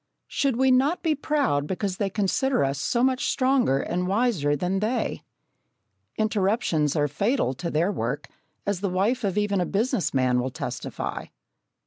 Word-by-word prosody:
Should 275 Hz, -4 st, 0 dB
we 265 Hz, 0 st, +4 dB
not 275 Hz, +7 st, +2 dB
be 320 Hz, -2 st, +2 dB
proud 275 Hz, -, 0 dB
because 190 Hz, +1 st, -2 dB
they 200 Hz, -, 0 dB
consider 210 Hz, -, +1 dB
us 135 Hz, 0 st, -1 dB
so 235 Hz, -, +1 dB
much 260 Hz, -1 st, +1 dB
stronger 255 Hz, -, +2 dB
and 180 Hz, +5 st, -2 dB
wiser 195 Hz, -, +1 dB
than 180 Hz, +6 st, -1 dB
they? 225 Hz, +4 st, -1 dB, 1.0 s
Interruptions 200 Hz, -, +1 dB
are 145 Hz, -1 st, +2 dB
fatal 200 Hz, -, 0 dB
to 170 Hz, +6 st, -4 dB
their 165 Hz, +5 st, +1 dB
work, 125 Hz, -, -3 dB, 0.4 s
as 200 Hz, -2 st, -1 dB
the 200 Hz, -, 0 dB
wife 205 Hz, +8 st, 0 dB
of 200 Hz, -1 st, -1 dB
even 205 Hz, -2 st, +1 dB
a -, -, +1 dB
business 210 Hz, -, 0 dB
man 130 Hz, -2 st, +2 dB
will 125 Hz, +1 st, -1 dB
testify. -, -, -5 dB
200 Hz, 160 wpm, -25 LUFS, 155-250 Hz, 1.0 s, we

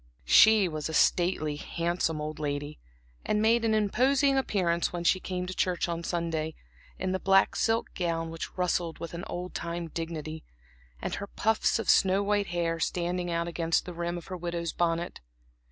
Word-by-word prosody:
She 215 Hz, -, +7 dB
was 155 Hz, -2 st, -4 dB
a 160 Hz, -, -3 dB
stately, 165 Hz, -4 st, +2 dB
handsome 170 Hz, 0 st, -1 dB
old 155 Hz, 0 st, -5 dB
lady, 145 Hz, 0 st, -3 dB, 0.4 s
and 210 Hz, -, 0 dB
made 225 Hz, +2 st, +3 dB
an 220 Hz, -1 st, +2 dB
imposing 265 Hz, +7 st, +3 dB
appearance 180 Hz, -10 st, +1 dB
when 175 Hz, -1 st, -4 dB
she 185 Hz, +2 st, +3 dB
came 185 Hz, -1 st, -4 dB
into 185 Hz, +1 st, -4 dB
church 180 Hz, -1 st, 0 dB
on 170 Hz, 0 st, -3 dB
Sunday, 165 Hz, -2 st, -2 dB, 0.4 s
in 185 Hz, 0 st, -2 dB
the 190 Hz, -, -1 dB
black 195 Hz, 0 st, +4 dB
silk 225 Hz, 0 st, 0 dB
gown 165 Hz, -2 st, -2 dB
which 165 Hz, +3 st, -7 dB
rustled 175 Hz, -2 st, 0 dB
with 170 Hz, 0 st, -7 dB
an 170 Hz, +1 st, -5 dB
old 180 Hz, +1 st, -5 dB
time 170 Hz, 0 st, -4 dB
dignity, 160 Hz, -1 st, -5 dB, 0.6 s
and -, -, -2 dB
her 200 Hz, -, -4 dB
puffs 220 Hz, +2 st, +1 dB
of 225 Hz, -, -4 dB
snow 195 Hz, +1 st, +4 dB
white 205 Hz, 0 st, +1 dB
hair 170 Hz, -1 st, -1 dB
standing 175 Hz, +2 st, -1 dB
out 170 Hz, 0 st, -1 dB
against 165 Hz, -1 st, 0 dB
the 180 Hz, -, -6 dB
rim 170 Hz, +1 st, -3 dB
of 170 Hz, -, -8 dB
her 185 Hz, -, -6 dB
widow's 170 Hz, -1 st, -3 dB
bonnet. 170 Hz, 0 st, -1 dB
175 Hz, 180 wpm, -28 LUFS, 165-190 Hz, 0.6 s, She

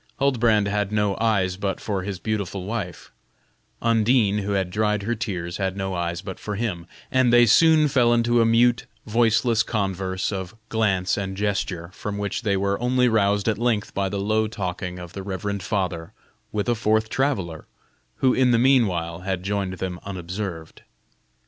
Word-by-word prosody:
Huldbrand 115 Hz, -6 st, +3 dB
had 105 Hz, 0 st, -1 dB
no 105 Hz, -2 st, +1 dB
eyes 95 Hz, -5 st, +1 dB
but 100 Hz, -1 st, -2 dB
for 100 Hz, -3 st, -2 dB
his 95 Hz, 0 st, -4 dB
beautiful 100 Hz, -2 st, -3 dB
wife 100 Hz, -4 st, -5 dB, 0.7 s
Undine, 115 Hz, -2 st, +3 dB
who 100 Hz, 0 st, -2 dB
had 95 Hz, -2 st, -1 dB
dried 105 Hz, 0 st, 0 dB
her 115 Hz, +4 st, 0 dB
tears, 95 Hz, -6 st, -4 dB
had 95 Hz, -1 st, -2 dB
no 95 Hz, -1 st, -2 dB
eyes 85 Hz, 0 st, -3 dB
but 95 Hz, -1 st, -7 dB
for 105 Hz, -, -4 dB
him, 100 Hz, -6 st, -3 dB, 0.2 s
and 130 Hz, -2 st, +3 dB
they 120 Hz, 0 st, +7 dB
soon 155 Hz, +6 st, +5 dB
fell 125 Hz, -4 st, +3 dB
into 120 Hz, 0 st, +3 dB
a -, -, +5 dB
mute, 120 Hz, +2 st, +3 dB, 0.2 s
voiceless 115 Hz, 0 st, +2 dB
converse 95 Hz, -3 st, -2 dB
of 95 Hz, 0 st, -5 dB
glance 95 Hz, -5 st, +1 dB
and 95 Hz, -1 st, -4 dB
gesture, 95 Hz, -4 st, -2 dB
from 100 Hz, 0 st, -5 dB
which 100 Hz, 0 st, -2 dB
they 100 Hz, -4 st, +1 dB
were 100 Hz, +2 st, -1 dB
only 125 Hz, 0 st, +3 dB
roused 100 Hz, -3 st, +2 dB
at 110 Hz, -2 st, +1 dB
length 115 Hz, -3 st, 0 dB
by 100 Hz, -1 st, -1 dB
the 100 Hz, +1 st, -3 dB
low 110 Hz, +2 st, +1 dB
talking 90 Hz, -4 st, -4 dB
of 90 Hz, -1 st, -9 dB
the 100 Hz, -, -6 dB
reverend 100 Hz, +1 st, -4 dB
father 90 Hz, -2 st, -2 dB, 0.4 s
with 105 Hz, +1 st, -2 dB
a 120 Hz, -, +3 dB
fourth 110 Hz, -1 st, +1 dB
traveller, 110 Hz, -, -2 dB, 0.5 s
who 130 Hz, -1 st, +2 dB
in 130 Hz, -1 st, +3 dB
the 120 Hz, -, +4 dB
mean 130 Hz, -1 st, +5 dB
while 85 Hz, -2 st, -3 dB
had 95 Hz, -1 st, -3 dB
joined 100 Hz, -1 st, -2 dB
them 90 Hz, -1 st, -4 dB
unobserved. 90 Hz, -3 st, -6 dB
100 Hz, 175 wpm, -24 LUFS, 95-115 Hz, 0.7 s, they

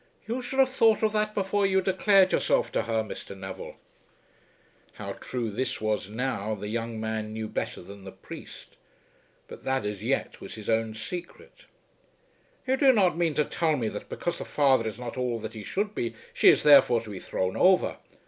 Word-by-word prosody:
"You 240 Hz, +3 st, -2 dB
should 250 Hz, +2 st, -5 dB
have 265 Hz, -1 st, +4 dB
thought 225 Hz, -4 st, +3 dB
of 215 Hz, -1 st, +2 dB
that 215 Hz, 0 st, 0 dB
before 200 Hz, +1 st, 0 dB
you 190 Hz, 0 st, +3 dB
declared 190 Hz, 0 st, +4 dB
yourself -, -, +1 dB
to -, -, +1 dB
her, 110 Hz, -1 st, -1 dB
Mr. 100 Hz, -2 st, -8 dB
Neville." 95 Hz, 0 st, -8 dB, 1.2 s
How -, -, -6 dB
true 120 Hz, -4 st, -4 dB
this 130 Hz, +6 st, -2 dB
was 105 Hz, -2 st, -1 dB
now, 110 Hz, -2 st, -2 dB
the 105 Hz, +1 st, -6 dB
young 115 Hz, 0 st, -3 dB
man 110 Hz, -1 st, -3 dB
knew 110 Hz, 0 st, -4 dB
better -, -, -4 dB
than 100 Hz, +2 st, -12 dB
the 95 Hz, -, -8 dB
priest, -, -, -11 dB, 0.7 s
but -, -, -11 dB
that, 130 Hz, -4 st, 0 dB
as 105 Hz, -1 st, -4 dB
yet, 130 Hz, +5 st, -2 dB
was -, -, -8 dB
his 110 Hz, 0 st, -3 dB
own 110 Hz, -1 st, 0 dB
secret. 175 Hz, -, -8 dB, 1.0 s
"You 260 Hz, 0 st, +1 dB
do 270 Hz, -1 st, +6 dB
not 195 Hz, -9 st, +3 dB
mean 165 Hz, -3 st, 0 dB
to 150 Hz, -, +2 dB
tell 160 Hz, -3 st, 0 dB
me 115 Hz, -4 st, -1 dB
that 105 Hz, -, -8 dB
because 175 Hz, -, -3 dB
the -, -, -5 dB
father 135 Hz, -6 st, +3 dB
is 110 Hz, -, -5 dB
not 125 Hz, 0 st, -6 dB
all 125 Hz, -2 st, -1 dB
that 110 Hz, 0 st, -7 dB
he 110 Hz, -2 st, -8 dB
should 205 Hz, -, -2 dB
be, 115 Hz, -, -3 dB, 0.2 s
she -, -, +6 dB
is -, -, +4 dB
therefore 140 Hz, -5 st, +7 dB
to 110 Hz, -2 st, -9 dB
be 95 Hz, -, -6 dB
thrown 95 Hz, +1 st, -2 dB
over. 185 Hz, 0 st, +4 dB
125 Hz, 195 wpm, -27 LUFS, -, 1.2 s, therefore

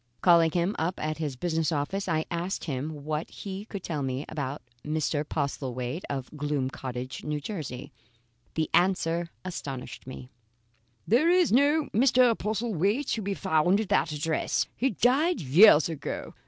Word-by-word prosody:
Calling 170 Hz, -2 st, +6 dB
him 175 Hz, +5 st, 0 dB
up 170 Hz, +3 st, -1 dB
at 155 Hz, +1 st, -3 dB
his 150 Hz, -4 st, -3 dB
business 160 Hz, +2 st, -1 dB
office, 160 Hz, +7 st, -2 dB
I 160 Hz, -1 st, +1 dB
asked 175 Hz, +3 st, -2 dB
him 145 Hz, +1 st, -4 dB
what 155 Hz, +1 st, -2 dB
he 195 Hz, 0 st, -7 dB
could 200 Hz, -4 st, -7 dB
tell 155 Hz, -4 st, -3 dB
me 135 Hz, +2 st, -2 dB
about 145 Hz, -2 st, -4 dB, 0.2 s
Mr. 150 Hz, -1 st, -1 dB
Postlethwaite 135 Hz, -1 st, -3 dB
of 135 Hz, +1 st, -5 dB
Gloom 145 Hz, -3 st, -1 dB
Cottage,, 130 Hz, -3 st, -6 dB
N. 150 Hz, 0 st, -2 dB
J. 145 Hz, -, -6 dB, 0.6 s
The 160 Hz, -1 st, 0 dB
answer 175 Hz, -2 st, +2 dB, 0.2 s
astonished 130 Hz, -8 st, -6 dB
me: 130 Hz, -1 st, -9 dB, 0.8 s
"There 255 Hz, -, +4 dB
is 360 Hz, -, +4 dB
no 290 Hz, +6 st, +4 dB
Mr. 245 Hz, 0 st, +4 dB
Postlethwaite 215 Hz, -, -1 dB
to 225 Hz, -, 0 dB
be 200 Hz, 0 st, -2 dB
found 180 Hz, +1 st, +2 dB
at 215 Hz, -, -3 dB
that 155 Hz, -, +2 dB
address. 150 Hz, +1 st, 0 dB
He 265 Hz, -, +1 dB
died 270 Hz, -, +2 dB
years 160 Hz, +3 st, +7 dB
ago. 160 Hz, -4 st, -5 dB
160 Hz, 155 wpm, -27 LUFS, 145-200 Hz, 0.8 s, years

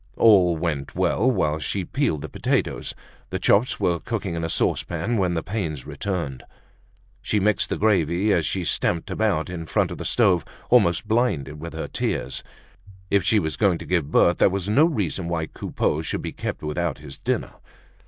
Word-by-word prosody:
All 90 Hz, -7 st, +5 dB
went 75 Hz, -4 st, -3 dB
well 125 Hz, -, +2 dB
while 75 Hz, -11 st, +1 dB
she 95 Hz, +4 st, -2 dB
peeled 120 Hz, -, -1 dB
the -, -, -4 dB
potatoes. -, -, -1 dB, 0.3 s
The -, -, -2 dB
chops 110 Hz, +6 st, +2 dB
were 85 Hz, -1 st, +1 dB
cooking 105 Hz, -5 st, -3 dB
in 85 Hz, 0 st, -3 dB
a 80 Hz, -, -2 dB
saucepan 85 Hz, +8 st, 0 dB
when 90 Hz, -2 st, +1 dB
the 80 Hz, -, -2 dB
pains 85 Hz, -, -3 dB
returned. 85 Hz, -10 st, -3 dB, 0.8 s
She 105 Hz, -, 0 dB
mixed 105 Hz, +1 st, +2 dB
the -, -, -1 dB
gravy 100 Hz, -1 st, +2 dB
as 85 Hz, -, +2 dB
she 95 Hz, +3 st, -1 dB
stamped 85 Hz, 0 st, 0 dB
about 105 Hz, -8 st, 0 dB
in 85 Hz, -2 st, -6 dB
front -, -, +1 dB
of -, -, -6 dB
the -, -, -4 dB
stove, 95 Hz, -, +3 dB, 0.3 s
almost 105 Hz, -5 st, +4 dB
blinded 95 Hz, -, 0 dB
with 85 Hz, 0 st, -6 dB
her -, -, -4 dB
tears. -, -, -2 dB, 0.7 s
If 100 Hz, -2 st, +3 dB
she 105 Hz, +4 st, +3 dB
was 80 Hz, -6 st, 0 dB
going 100 Hz, -5 st, +3 dB
to -, -, -9 dB
give 85 Hz, -6 st, 0 dB
birth, 85 Hz, +2 st, +4 dB
that -, -, +6 dB
was 95 Hz, -1 st, -2 dB
no 135 Hz, +10 st, +5 dB
reason 100 Hz, -, -1 dB
why 85 Hz, -2 st, -1 dB
Coupeau 75 Hz, 0 st, -2 dB
should 80 Hz, -, -3 dB
be -, -, -3 dB
kept -, -, -5 dB
without 75 Hz, 0 st, -2 dB
his 75 Hz, -2 st, -11 dB
dinner. -, -, -2 dB
90 Hz, 185 wpm, -24 LUFS, 80-105 Hz, 0.8 s, that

